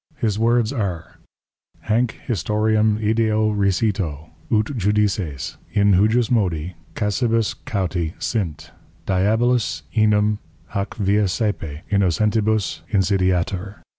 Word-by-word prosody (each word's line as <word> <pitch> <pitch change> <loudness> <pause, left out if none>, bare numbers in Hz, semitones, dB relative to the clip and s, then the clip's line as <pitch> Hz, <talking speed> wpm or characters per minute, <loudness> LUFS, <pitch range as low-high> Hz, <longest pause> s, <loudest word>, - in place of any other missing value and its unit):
His 110 -6 -1
Words 115 +1 +2
are, 95 - -4 0.7
_Hanc 115 +1 +1
Historiam 110 0 +1
ideo 110 -1 +1
recito, 95 -6 0 0.2
ut 110 +5 +1
Judices, 100 - -1 0.2
in 100 -1 +4
hujusmodi, 100 - +2 0.2
Casibus 115 +1 +1
cauti 90 -5 -2
sint: 85 -7 -3 0.3
Diabolus 110 - +1
enim 105 -1 +3 0.3
hac 100 -1 -3
via 105 0 +2
sæpe 90 -6 -2
innocentibus 105 0 +1
insidiatur. 95 0 0
105 Hz, 90 wpm, -21 LUFS, 95-110 Hz, 0.7 s, in